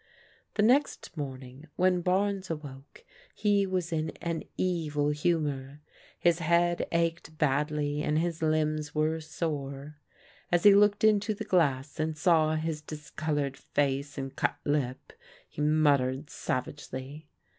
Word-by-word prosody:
The 210 - +2
next 260 0 +2
morning 135 0 -7
when 180 -1 +2
Barnes 190 +1 0
awoke 150 - -8 0.3
he 200 -2 +2
was 180 -2 -2
in 160 0 -1
an 170 -1 -2 0.2
evil 155 -5 0
humour. 145 -3 -1 0.4
His 170 0 +2
head 170 +1 +2
ached 165 -1 -1
badly 150 0 0
and 150 0 0
his 165 0 -1
limbs 155 -1 0
were 155 +1 +1
sore. 150 -2 -4 0.5
As 175 -1 +3
he 205 - +9
looked 205 +1 +4
into 215 0 +3
the - - -6
glass 145 -5 +1
and 155 0 -1
saw 155 -2 +3
his 155 -1 -2
discol 155 0 -4
oured 140 -2 -2
face 140 0 -1
and 135 -1 -5
cut - - 0
lip, 140 -3 -1 0.3
he - - -7
muttered 145 -2 +2
savagely. 140 +3 -5
155 Hz, 135 wpm, -29 LUFS, 145-170 Hz, 0.5 s, he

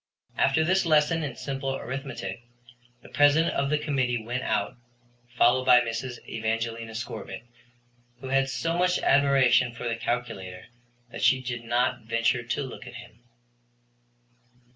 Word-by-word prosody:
After 150 +4 +2
this 185 +4 +2
lesson 160 0 +2
in 135 -5 -4
simple 135 -1 -3
arithmetic 130 -7 -6 0.6
the - - -14
President 145 +4 +4
of 140 0 0
the 150 - +2
Committee 130 -6 -1
went 125 +2 -3
out, 105 -4 -1 0.6
followed 130 +2 +4
by 125 -1 +7
Mrs. 120 +1 -5
Evangelina 115 0 -3
Scorbitt, 115 0 -6 0.8
who 130 0 -7
had 135 0 +2
so 165 +4 -2
much 180 +1 +2
admiration 130 -4 +3
for 120 - -5
the 115 - -1
calculator 100 -6 -4 0.5
that - - -7
she 130 - +4
did 120 -2 -5
not 120 +1 0
venture 115 +2 0
to 120 +4 -3
look 130 -1 -9
at 120 - -10
him. 110 - -12
125 Hz, 140 wpm, -26 LUFS, 115-140 Hz, 0.8 s, by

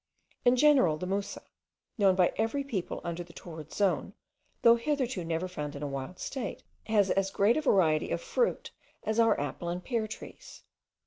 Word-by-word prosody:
In 245 +1 +5
general, 255 - +5
the 180 - -4
musa, 195 +2 -3 0.5
known 195 -4 +4
by 180 -1 +3
every 225 +6 0
people 220 -10 -4
under 170 0 -4
the 170 - -16
torrid 160 -3 -10
zone, 195 -1 0 0.5
though 235 0 +8
hitherto 255 - -1
never 165 +2 -2
found 150 -5 -5
in 140 - -6
a - - -1
wild 140 +5 -5
state, 260 +5 -5 0.2
has 205 -3 +3
as 195 0 +1
great 200 +4 +3
a 310 - +1
variety 165 - +3
of - - -1
fruit 485 0 -1 0.3
as 220 +1 -1
our 225 -1 +4
apple 145 +4 -4
and 175 +1 -4
pear 230 -4 -1
trees. 215 - -10
195 Hz, 180 wpm, -30 LUFS, 170-235 Hz, 0.5 s, though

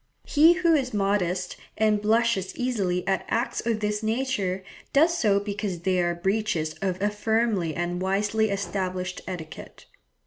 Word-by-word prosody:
He 320 +3 +6
who 340 -1 +2
is 260 -7 0
modest, 190 -3 0 0.2
and 215 -1 +2
blushes 220 -3 +1
easily 195 -8 -1
at 195 -1 +1
acts 240 +3 -1
of 225 -2 -1
this 210 0 -1
nature, 220 -5 -1 0.3
does 320 +4 +4
so 205 -10 +3
because 200 -3 -4
they 185 0 +1
are 175 0 0
breaches 190 -3 -1
of 190 -2 -1
a 205 +1 +1
firmly 210 -6 0
and 175 +1 -2
wisely 205 +3 +1
established 185 -2 -3
etiquette. 170 -4 -8
200 Hz, 145 wpm, -26 LUFS, 185-220 Hz, 0.3 s, He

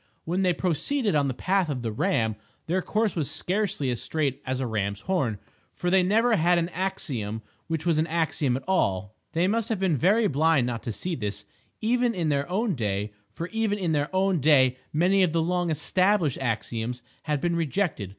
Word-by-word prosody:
When 180 +4 0
they 185 -1 +3
proceeded 200 - 0
on 145 -2 +2
the 130 - -1
path 190 +1 +1
of 130 -4 -3
the 115 - -2
Ram, 115 - 0 0.3
their 185 +3 0
course 215 +2 0
was 155 -6 -1
scarcely 185 -9 -1
as 120 - -3
straight 145 -3 -1
as 130 0 -1
a 130 - -1
ram's 100 -3 -2
horn, 140 - 0 0.4
for 175 - -1
they 190 0 +5
never 220 +6 +3
had 175 +2 +3
an 170 0 0
axiom 130 - -3 0.2
which 160 -1 -3
was 165 -3 +2
an 160 - +1
axiom 160 -5 0
at 135 - -8
all. 100 - 0 0.2
They 170 +3 +2
must 225 +3 0
have 220 -4 -1
been 190 -5 +2
very 200 - +3
blind 155 -5 +3
not 120 -2 -3
to 115 - -2
see 175 - -3
this, 105 -6 -4 0.4
even 240 +1 +1
in 170 -4 0
their 140 +1 0
own 205 +3 0
day; 105 -5 -2 0.2
for 165 +11 -5
even 225 -2 0
in 180 -5 -1
their 145 -1 0
own 190 -1 +2
day 130 -3 +5 0.2
many 180 +5 +3
of 180 -4 +2
the 165 - +2
long 175 0 0
"established" 170 +1 +2
axioms 120 0 -3 0.2
had 150 -2 0
been 170 +3 0
rejected. 165 - -1
165 Hz, 200 wpm, -26 LUFS, 130-190 Hz, 0.4 s, they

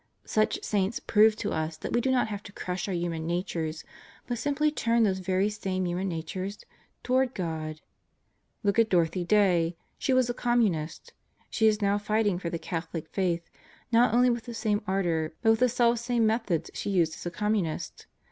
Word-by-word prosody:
Such 215 0 +1
saints 200 +1 0
prove 215 0 +4
to 210 - -3
us 160 0 -2
that - - -5
we 240 - +3
do 265 - 0
not 255 -3 +2
have 205 -2 -5
to 205 - -11
crush 180 -1 -4
our 195 - -2
human 170 -2 -2
natures, 165 -2 -2 0.4
but 240 -2 -3
simply 290 +4 +1
turn 235 -5 +2
those 190 -3 +1
very 185 +2 +1
same 190 -3 -2
human 180 +2 -1
natures 185 +4 -4 0.5
toward 260 0 +1
God. 155 -3 -4 0.8
Look 200 +2 +2
at 225 -1 +4
Dorothy 175 0 +2
Day. 175 -4 +3 0.2
She - - 0
was 255 -1 +4
a 245 - -1
Communist. 220 -11 0 0.4
She 220 - +3
is 210 -1 +2
now 200 +1 +2
fighting 210 -3 +1
for 170 - -3
the 170 - -3
Catholic 165 -1 -5
Faith, 175 -3 -1 0.4
not 235 0 +5
only 245 +2 +4
with 235 -1 -3
the 240 -2 -7
same 210 -2 0
ardor, 170 -5 0
but 225 - +6
with 225 - +2
the 250 0 +4
selfsame 235 0 +2
methods 220 -7 0
she - - -4
used 170 -5 +2
as - - -7
a - - 0
Communist. 205 -3 -2
200 Hz, 185 wpm, -28 LUFS, 170-225 Hz, 0.8 s, but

